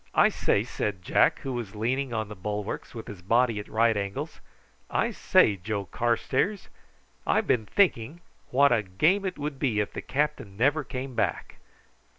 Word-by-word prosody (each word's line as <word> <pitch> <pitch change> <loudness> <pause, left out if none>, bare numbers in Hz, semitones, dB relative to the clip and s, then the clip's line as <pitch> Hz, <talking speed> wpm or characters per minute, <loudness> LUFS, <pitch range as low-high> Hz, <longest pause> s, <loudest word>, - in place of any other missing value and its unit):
"I - - +6
say," - - +1
said 95 -4 -3
Jack, - - +3
who 135 - -4
was 115 -4 -5
leaning 125 +5 -1
on 110 -2 -2
the 105 - -8
bulwarks, 105 +4 -5
with 115 - -6
his 100 -4 -9
body 115 +3 +2
at 105 - -7
right 115 0 +2
angles; 100 -1 -4 0.5
"I - - 0
say, 100 - +3
Joe 100 +2 -3
Carstairs, 125 - -1 0.6
I've - - +2
been 110 -4 +1
thinking 170 - +1 0.3
what 140 +2 +4
a 115 -2 +3
game 155 - +1
it 185 - -3
would 145 -2 -4
be 120 -7 +1
if 105 - -2
the - - -5
captain 140 -9 -2
never 145 +6 +2
came 130 +1 -6
back." - - -2
115 Hz, 170 wpm, -27 LUFS, 105-135 Hz, 0.6 s, I